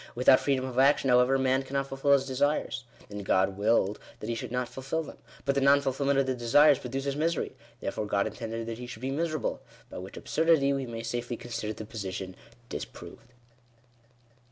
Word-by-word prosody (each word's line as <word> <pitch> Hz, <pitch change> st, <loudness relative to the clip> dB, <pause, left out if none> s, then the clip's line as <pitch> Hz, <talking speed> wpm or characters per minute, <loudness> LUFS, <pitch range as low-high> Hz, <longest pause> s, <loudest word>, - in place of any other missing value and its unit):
Without 130 Hz, +2 st, +6 dB
freedom 135 Hz, -2 st, 0 dB
of 130 Hz, -1 st, -2 dB
action, 135 Hz, -1 st, +4 dB
however, 125 Hz, +2 st, +5 dB
man 130 Hz, 0 st, +2 dB
cannot 135 Hz, +1 st, -2 dB
fulfil 135 Hz, +1 st, +1 dB
his 135 Hz, -1 st, +3 dB
desires. 130 Hz, -1 st, 0 dB, 0.2 s
Then 105 Hz, 0 st, -7 dB
God 95 Hz, 0 st, +2 dB
willed 105 Hz, 0 st, +2 dB, 0.2 s
that 105 Hz, -, -6 dB
he -, -, 0 dB
should 120 Hz, 0 st, -5 dB
not 125 Hz, 0 st, -1 dB
fulfil 135 Hz, +6 st, -3 dB
them. -, -, -11 dB, 0.3 s
But 140 Hz, -, +2 dB
the 140 Hz, -, +1 dB
non 140 Hz, +1 st, +6 dB
fulfilment 140 Hz, 0 st, 0 dB
of 135 Hz, -, +3 dB
the 130 Hz, -, 0 dB
desires 130 Hz, +4 st, +5 dB
produces 135 Hz, +2 st, -3 dB
misery. 160 Hz, +2 st, 0 dB, 0.3 s
Therefore, 105 Hz, -, -3 dB
God 100 Hz, -1 st, +1 dB
intended 115 Hz, -1 st, -4 dB
that 115 Hz, 0 st, -5 dB
he 125 Hz, -, -7 dB
should 120 Hz, 0 st, -9 dB
be 135 Hz, -, -1 dB
miserable. 155 Hz, -2 st, -2 dB, 0.3 s
By -, -, -6 dB
which 95 Hz, +2 st, -9 dB
absurdity 160 Hz, -4 st, +2 dB
we 135 Hz, -2 st, -2 dB
may 115 Hz, -1 st, -6 dB
safely 120 Hz, +1 st, -3 dB
consider 115 Hz, -2 st, -4 dB
the 110 Hz, -, -8 dB
position 95 Hz, -4 st, -5 dB, 0.3 s
dis -, -, -4 dB
proved. 120 Hz, -, -12 dB
130 Hz, 195 wpm, -29 LUFS, 115-140 Hz, 0.3 s, Without